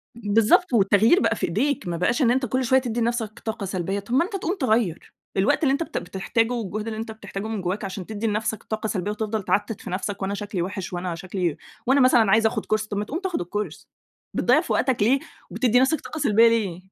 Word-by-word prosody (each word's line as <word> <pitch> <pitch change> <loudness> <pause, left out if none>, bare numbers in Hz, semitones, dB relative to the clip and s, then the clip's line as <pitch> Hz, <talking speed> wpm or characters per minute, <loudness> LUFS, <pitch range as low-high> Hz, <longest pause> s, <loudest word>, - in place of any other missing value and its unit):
بالضبط 225 - +3
والتغيير 215 - +5
بقى 230 - +2
في - - -1
إيديك، 235 - -1
ما 170 - -2
بقاش 235 - +1
إن 240 -2 +4
أنت 260 +1 +1
كل 255 +3 0
شويّة 260 +3 +4
تدّي 240 -1 -2
لنفسك 230 -2 -2
طاقة 220 -2 -4
سلبيّة، 190 +1 -2
طب 205 +4 -7
ما 270 +6 +4
أنت 405 - -10
تقوم 370 0 -1
تغيّر، 220 - 0 0.2
الوقت 195 +10 +2
اللي 270 - +4
أنت 280 +4 +1
بت - - -6
بتحتاجه 225 +6 -1
والجهد 215 -1 -4
اللي 220 -1 -4
أنت 225 0 -5
بتحتاجه 205 -1 -6
من 220 -3 -3
جوّاك 190 +3 -2
عشان 190 -1 -6
تدّي 215 +2 -3
لنفسك 215 +1 -2
طاقة 220 0 -3
سلبيّة، 205 -1 -2
وتفضل 215 -1 -3
تعتت 205 +2 -1
في - - -8
نفسك 195 +2 -3
وأنا 195 +1 -1
شكلي 205 -2 -3
وحِش، 190 0 -4
وأنا 175 -1 -3
شكلي 180 -2 -3 0.3
وأنا 270 +1 +5
مثلًا 235 -5 +5
عايز 220 +1 +4
آخد 220 - 0
Course، 215 0 0
طب 205 - -2
ما 205 - -1
تقوم 305 +10 -4
تاخد 380 -2 -2
ال 175 - -5
Course، 205 -4 -4 0.5
بتضيّع - - +3
في - - -2
وقتك 255 -6 +1
ليه، 260 +6 +4 0.3
وبتدي 245 -1 +2
نفسك 270 +5 +2
طاقة 315 - -7
سلبيّة 230 -4 +5
ليه؟ 200 -7 0
215 Hz, 230 wpm, -24 LUFS, 195-240 Hz, 0.5 s, والتغيير